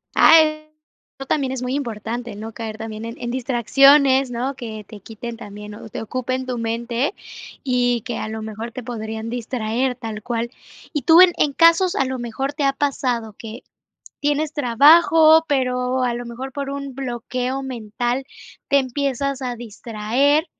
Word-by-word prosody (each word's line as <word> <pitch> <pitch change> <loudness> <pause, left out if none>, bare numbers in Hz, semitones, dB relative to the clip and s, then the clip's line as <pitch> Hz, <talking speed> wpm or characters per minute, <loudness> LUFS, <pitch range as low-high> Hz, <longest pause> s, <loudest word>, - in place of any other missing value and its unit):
Ah, 325 - +8 0.8
eso 270 - -6
también 270 -3 0
es 255 - -4
muy 250 +1 -2
importante, 235 -3 -4
no 220 +2 -7
caer 220 -1 -6
también 220 0 -6
en 230 0 -6
en 240 - -4
distracciones, 265 +2 +4
¿no?, 250 +3 -2
que 220 -4 -7
te 215 - -11
quiten 225 +3 -8
también, 210 -1 -9
o 220 - -11
te - - -6
ocupen 255 +3 -3
tu 250 -1 -3
mente 235 - -1 0.5
y 245 -2 +1
que 235 - -5
a - - -4
lo 220 0 -5
mejor 220 +2 -6
te 250 +1 -7
podrían 220 -1 -5
distraer 245 +1 -2
tal 220 -3 -6
cual. 235 +1 -3 0.4
Y 295 -4 -2
tú, 325 +6 +7
en 365 -1 +7
en 290 - +2
casos 335 +4 +4
a 270 - +2
lo 260 0 -3
mejor 240 +4 -3
te 290 0 -3
ha 275 0 +3
pasado 250 -6 -1
que 225 +2 -9 0.6
tienes 295 +1 0
trabajo, 315 +5 +6
pero, 255 -2 0
a 245 -1 +1
lo 240 +1 -5
mejor 245 +3 -7
por 280 0 -4
un 280 -1 -5
bloqueo 255 +1 -3
mental 245 +1 -3 0.4
te 280 - +4
empiezas 275 0 -2
a 250 -2 -3
distraer, 240 +6 0
250 Hz, 170 wpm, -21 LUFS, 230-275 Hz, 0.8 s, Ah